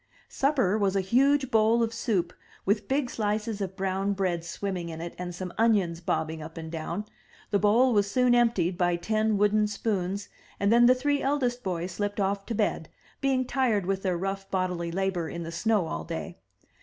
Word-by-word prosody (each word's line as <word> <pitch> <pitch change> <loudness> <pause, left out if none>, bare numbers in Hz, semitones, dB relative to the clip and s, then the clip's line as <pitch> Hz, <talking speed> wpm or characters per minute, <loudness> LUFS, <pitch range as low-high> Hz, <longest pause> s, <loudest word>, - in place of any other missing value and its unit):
Supper 255 -8 +1
was 200 -1 +1
a 195 - +3
huge 265 +7 +2
bowl 225 +1 +4
of 225 0 -2
soup, 190 -7 -1 0.3
with 205 +1 +1
big 270 -1 +1
slices 210 -1 -2
of 190 -1 -3
brown 195 +1 -1
bread 185 -4 -1
swimming 180 -1 -4
in 160 -1 -7
it 170 +1 -6
and 175 -1 -5
some 180 0 -6
onions 195 -7 +2
bobbing 160 -1 -2
up 160 +1 -9
and 160 -1 -6
down; 170 +5 -4 0.5
the 200 - +3
bowl 235 +5 +4
was 200 -2 +2
soon 250 +2 +3
emptied 230 -7 +2
by 175 -1 +2
ten 215 +4 0
wooden 210 +1 +3
spoons, 200 -2 -2 0.3
and 200 +2 +3
then 240 0 +6
the 255 - +6
three 285 +2 0
eldest 255 -3 0
boys 180 -3 -3
slipped 205 +3 -3
off 200 0 -1
to 230 - -2
bed, - - -1 0.3
being 265 -2 +1
tired 240 -7 +1
with 195 0 -1
their 185 -3 0
rough 195 +2 -4
bodily 180 -3 -1
labor 185 -2 -1
in 170 0 -5
the 165 - -6
snow 210 +2 +1
all 80 - -4
day. - - -6
200 Hz, 195 wpm, -27 LUFS, 180-230 Hz, 0.5 s, then